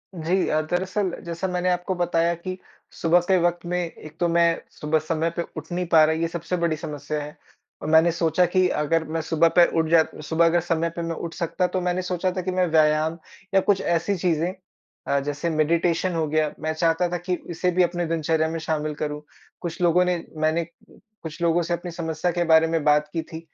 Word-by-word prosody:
जी 175 Hz, +3 st, 0 dB
अ, 155 Hz, 0 st, +2 dB
दरअसल 185 Hz, +4 st, -1 dB
जैसा 170 Hz, +2 st, -3 dB
मैंने 180 Hz, 0 st, -1 dB
आपको 180 Hz, +1 st, -1 dB
बताया 170 Hz, -1 st, +1 dB
कि 185 Hz, +2 st, -6 dB, 0.4 s
सुबह 165 Hz, +2 st, +5 dB
के 190 Hz, -1 st, +4 dB
वक़्त 175 Hz, 0 st, 0 dB
में 180 Hz, +1 st, -1 dB
एक 165 Hz, -2 st, -7 dB
तो 175 Hz, -, +2 dB
मैं 170 Hz, 0 st, +2 dB, 0.2 s
सुबह 155 Hz, +1 st, +1 dB
समय 160 Hz, +1 st, -1 dB
पे 170 Hz, -, -1 dB, 0.2 s
उठ 160 Hz, +3 st, -8 dB
नहीं 180 Hz, +1 st, -1 dB
पा 160 Hz, -2 st, +6 dB
रहा, 160 Hz, +1 st, +3 dB
ये 165 Hz, +1 st, 0 dB
सबसे 170 Hz, +2 st, -3 dB
बड़ी 170 Hz, -2 st, 0 dB
समस्या 150 Hz, 0 st, -5 dB
है। 150 Hz, +1 st, -10 dB, 0.5 s
मैंने 160 Hz, +2 st, +5 dB
सोचा 165 Hz, +1 st, +2 dB
कि 185 Hz, +1 st, +2 dB
अगर 160 Hz, +1 st, 0 dB
मैं 160 Hz, +1 st, -2 dB
सुबह 160 Hz, +1 st, +2 dB
पे 175 Hz, -, +9 dB
उठ 160 Hz, -, +2 dB
जा 165 Hz, -1 st, +6 dB, 0.2 s
सुबह 160 Hz, +2 st, +2 dB
अगर 170 Hz, +1 st, +3 dB
समय 165 Hz, 0 st, 0 dB
पे 170 Hz, -, -3 dB
मैं 165 Hz, -1 st, -3 dB
उठ 165 Hz, +1 st, -6 dB
सकता 180 Hz, +1 st, -1 dB
तो 185 Hz, -, +1 dB
मैंने 180 Hz, +1 st, 0 dB
सोचा 180 Hz, 0 st, -1 dB
था -, -, 0 dB
कि 185 Hz, +1 st, -3 dB
मैं 185 Hz, 0 st, +2 dB
व्यायाम 155 Hz, 0 st, +2 dB, 0.4 s
या 195 Hz, -, +6 dB
कुछ 195 Hz, -, +4 dB
ऐसी 170 Hz, +4 st, 0 dB
चीज़ें 175 Hz, 0 st, 0 dB, 0.5 s
अ, 140 Hz, 0 st, +2 dB
जैसे 145 Hz, +4 st, -3 dB
मेडिटेशन 170 Hz, +3 st, +1 dB
हो 160 Hz, -2 st, 0 dB
गया, 155 Hz, 0 st, +1 dB
मैं 155 Hz, +1 st, -2 dB
चाहता 165 Hz, +2 st, +1 dB
था 175 Hz, -, -2 dB
कि 180 Hz, +1 st, -2 dB
इसे 175 Hz, +2 st, 0 dB
भी 180 Hz, +1 st, +3 dB
अपने 175 Hz, 0 st, -1 dB
दिनचर्या 160 Hz, -1 st, 0 dB
में 165 Hz, 0 st, -3 dB
शामिल 155 Hz, -1 st, -2 dB
करूँ। 150 Hz, 0 st, -4 dB, 0.4 s
कुछ 170 Hz, 0 st, -5 dB
लोगों 175 Hz, +1 st, +4 dB
ने 180 Hz, -2 st, -1 dB
मैंने 155 Hz, +2 st, +1 dB, 0.6 s
कुछ 160 Hz, +1 st, -8 dB
लोगों 170 Hz, 0 st, +3 dB
से 175 Hz, +1 st, -2 dB
अपनी 175 Hz, +1 st, -4 dB
समस्या 165 Hz, +1 st, -2 dB
के 175 Hz, 0 st, 0 dB
बारे 160 Hz, 0 st, +6 dB
में 160 Hz, -2 st, -1 dB
बात 150 Hz, 0 st, +3 dB
की 165 Hz, -, -1 dB
थी 160 Hz, 0 st, -9 dB
165 Hz, 215 wpm, -24 LUFS, 160-175 Hz, 0.6 s, पे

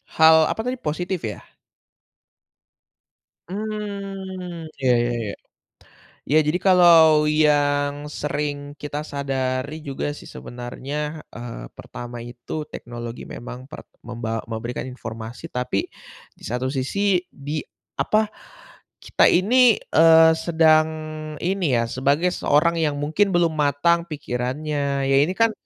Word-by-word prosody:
Hal 160 Hz, 0 st, +7 dB
apa -, -, -5 dB
tadi, 250 Hz, +1 st, -1 dB
positif 180 Hz, 0 st, -3 dB
ya? 105 Hz, -, -5 dB, 2.1 s
Mmm 195 Hz, -4 st, -5 dB, 0.2 s
iya, 130 Hz, -, +2 dB, 0.2 s
ya -, -, 0 dB, 0.2 s
ya. -, -, -5 dB, 1.0 s
Ya 155 Hz, -, +6 dB
jadi 155 Hz, +4 st, +1 dB
kalau 165 Hz, -4 st, +7 dB
yang 145 Hz, -1 st, +2 dB
sering 145 Hz, -1 st, -3 dB
kita 150 Hz, 0 st, -4 dB
sadari 135 Hz, 0 st, -2 dB
juga 135 Hz, -, -3 dB
sih -, -, -12 dB
sebenarnya, 125 Hz, +3 st, -7 dB, 0.4 s
eee, 115 Hz, -, -7 dB
pertama 120 Hz, 0 st, -9 dB
itu 120 Hz, 0 st, -12 dB, 0.2 s
teknologi 120 Hz, 0 st, -7 dB
memang 125 Hz, +1 st, -8 dB
per -, -, -8 dB, 0.3 s
membaw 115 Hz, -1 st, -3 dB
memberikan 115 Hz, +2 st, -4 dB
informasi 115 Hz, -2 st, -8 dB
tapi 125 Hz, -5 st, -2 dB, 0.5 s
di -, -, -19 dB
satu 125 Hz, +2 st, -2 dB
sisi 135 Hz, +8 st, -2 dB, 0.3 s
di, 145 Hz, +3 st, -5 dB, 0.4 s
apa, 215 Hz, 0 st, +2 dB, 0.8 s
kita -, -, +4 dB
ini, 235 Hz, +5 st, +5 dB, 0.2 s
eee, 160 Hz, 0 st, +7 dB
sedang 160 Hz, -1 st, +4 dB, 0.6 s
ini 190 Hz, +1 st, 0 dB
ya 115 Hz, -, +2 dB
sebagai 140 Hz, +9 st, +1 dB
seorang 170 Hz, +2 st, +2 dB
yang 150 Hz, -2 st, +1 dB
mungkin 160 Hz, +8 st, +2 dB
belum 170 Hz, -2 st, +3 dB
matang 150 Hz, +3 st, +2 dB
pikirannya, 140 Hz, 0 st, -2 dB
ya 135 Hz, -, +4 dB
ini 175 Hz, +5 st, -1 dB
kan 230 Hz, 0 st, +4 dB
150 Hz, 115 wpm, -23 LUFS, 130-170 Hz, 2.1 s, Hal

